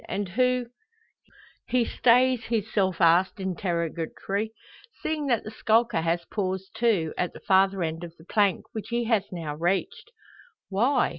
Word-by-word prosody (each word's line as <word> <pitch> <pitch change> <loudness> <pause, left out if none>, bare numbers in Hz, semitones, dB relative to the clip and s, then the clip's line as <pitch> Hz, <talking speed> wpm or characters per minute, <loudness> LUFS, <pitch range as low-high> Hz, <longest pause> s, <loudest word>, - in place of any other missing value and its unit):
And 200 -2 -2
who 250 +4 +1 0.5
" - - -27 0.2
He 250 -2 +2
stays 250 0 +3
his 220 -2 -2
self 190 -4 +1
asked 175 +4 +4
interrogatory, 180 +3 -2 0.5
seeing 305 -2 -1
that 240 -4 +1
the 215 - -7
skulker 225 -4 +2
has 170 +1 -1
paused 190 -2 -3
too 200 -10 +1
at 180 - -1
the - - -10
farther 195 -1 +3
end 165 +1 -3
of 170 -1 -9
the 160 - -17
plank, 200 -1 +1
which 220 - -6
he 235 0 0
has 225 -4 +1
now 165 -5 -4
reached. 175 - -1 0.6
Why? 240 +7 +2
195 Hz, 155 wpm, -26 LUFS, 175-230 Hz, 0.6 s, asked